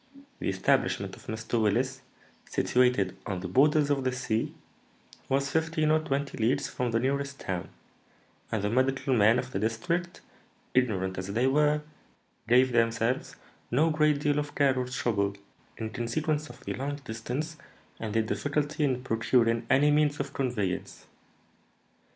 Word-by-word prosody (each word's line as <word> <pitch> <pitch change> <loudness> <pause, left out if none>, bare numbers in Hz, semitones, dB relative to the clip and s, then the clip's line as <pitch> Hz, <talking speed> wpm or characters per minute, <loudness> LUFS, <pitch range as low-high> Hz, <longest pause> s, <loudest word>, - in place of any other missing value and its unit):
The - - -1
establishment 95 0 +1
of - - -17
Mr. 110 +1 -2
Willis, 125 +5 +1 0.5
situated 125 -7 +2
on 95 -3 -2
the 95 - -4
borders 145 - +4
of 140 -2 +1
the 130 - +1
sea, 125 -3 -1 0.8
was 140 +1 +1
fifteen 160 -1 +1
or 155 - +4
twenty 140 -3 -3
leagues 135 +5 +1
from 125 -1 -2
the 115 0 +1
nearest 140 +2 -1
town; 90 -2 -4 0.8
and 105 -2 -1
the 105 - +1
medical 130 +2 +1
men 110 +2 +5
of 130 0 -3
the 95 - -2
district, 170 - -2 0.5
ignorant 95 -7 +1
as 95 - -4
they 120 +4 +2
were, 150 +2 +3 0.6
gave 125 +2 +5
themselves 115 +1 +1 0.3
no 155 +7 +3
great 150 -1 +3
deal 145 0 +1
of 145 0 -5
care 140 -2 +3
or 125 -1 -1
trouble, 100 -6 -1 0.4
in 110 -1 -4
consequence 150 +5 -1
of - - -14
the - - -2
long 140 +2 -3
distance 125 +8 -4 0.4
and 110 -1 -4
the 110 - +3
difficulty 145 +6 -1
in 130 -3 0
procuring 115 -1 +2
any 145 +3 +5
means 145 0 +2
of 140 0 -4
conveyance. 115 -9 -2
130 Hz, 150 wpm, -28 LUFS, 115-145 Hz, 0.8 s, men